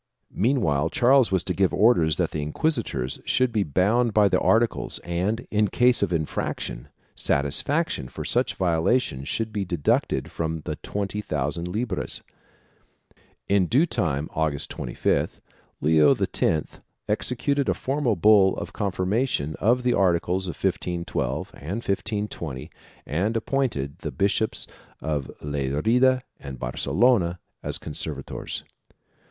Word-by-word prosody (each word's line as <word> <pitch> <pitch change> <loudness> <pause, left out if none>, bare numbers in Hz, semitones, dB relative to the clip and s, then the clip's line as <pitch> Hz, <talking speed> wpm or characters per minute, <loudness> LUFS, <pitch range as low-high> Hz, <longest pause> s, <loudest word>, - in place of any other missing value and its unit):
Meanwhile 95 - +1
Charles 130 +4 +4
was 95 -3 +2
to 90 - -2
give 95 +1 +2
orders 90 -8 +4
that - - 0
the 75 - -3
inquisitors 75 - -1
should 130 -1 +2
be 110 -2 +1
bound 100 - +2
by 105 -2 +5
the - - +2
articles 115 +1 +1
and, 90 +7 -1
in 105 0 +3
case 125 +5 +3
of - - +1
infraction, 80 -6 -3 0.3
satisfaction 75 - +1
for - - -7
such - - +1
violations 85 - +1
should 110 -1 -2
be 105 -2 -1
deducted 85 -5 0
from 80 -1 -3
the 75 0 -5
twenty 105 +1 -3
thousand 75 0 -2
libras. 110 +7 -3 1.2
In 100 -3 +3
due 135 - +4
time, 80 - -1
August 75 -3 -1
25th, - - -1 0.4
Leo 75 0 +5
X 80 -2 -1 0.3
executed 140 +3 0
a - - +2
formal 135 -4 0
bull 100 +1 +5
of - - -6
confirmation 95 - -1
of 120 +4 +2
the 125 - +2
articles 90 0 +1
of 85 - -4
1512 90 -2 -2
and 95 +11 -5
1520 100 -9 -3 0.3
and 100 +10 0
appointed 110 - -1
the 75 - -4
Bishops 100 +9 0 0.3
of 75 -4 -2
Lerida 75 - +2 0.2
and 70 -2 -8
Bar - - -4
celona 90 - +2 0.2
as - - -2
conservators. 75 - -6
95 Hz, 130 wpm, -25 LUFS, 75-115 Hz, 1.2 s, by